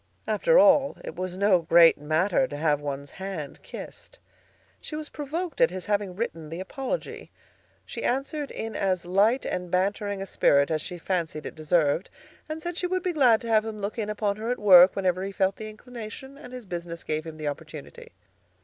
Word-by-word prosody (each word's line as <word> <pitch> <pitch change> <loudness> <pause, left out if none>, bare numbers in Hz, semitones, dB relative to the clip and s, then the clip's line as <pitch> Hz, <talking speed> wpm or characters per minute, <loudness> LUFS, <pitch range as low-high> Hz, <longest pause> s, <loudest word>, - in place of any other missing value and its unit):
After - - +3
all, 285 - +5
it - - -7
was 185 0 -4
no 195 -3 +4
great 165 0 +6
matter 160 - +1
to 145 - -7
have 150 -1 +1
one's 140 -1 -5
hand 190 -7 -6
kissed. - - -10 0.6
She 305 - -7
was 305 -1 -6
provoked 315 +4 -4
at 250 - +6
his 185 0 -6
having 205 -3 -1
written 165 -7 -4
the 165 +2 -6
apology. 270 - -5 0.6
She - - -7
answered 275 +3 -1
in 225 0 -5
as 185 -3 0
light 205 +8 +2
and 180 -1 -3
bantering 200 +2 0
a 195 - -4
spirit 140 -5 +3
as 155 -1 0
she 180 +1 -7
fancied 165 -3 -3
it - - -6
deserved, 155 +1 +1 0.4
and 310 +1 -4
said 345 0 -4
she 360 - -1
would 370 0 -1
be 360 - -1
glad 250 -8 +4
to 235 - -7
have 215 -1 +4
him 220 -1 -6
look 205 +3 -4
in 210 -1 -2
upon 210 -1 -1
her 220 +2 -4
at 250 - 0
work 185 -3 +7
whenever 185 -2 0
he 195 +1 -3
felt 195 -1 0
the 215 0 -6
inclination 240 +3 -9
and 250 -3 -12
his 250 -2 -8
business 170 -2 -6
gave 155 0 -2
him 160 -1 -9
the 155 -1 -4
opportunity. 155 0 -8
195 Hz, 200 wpm, -26 LUFS, 170-245 Hz, 0.6 s, work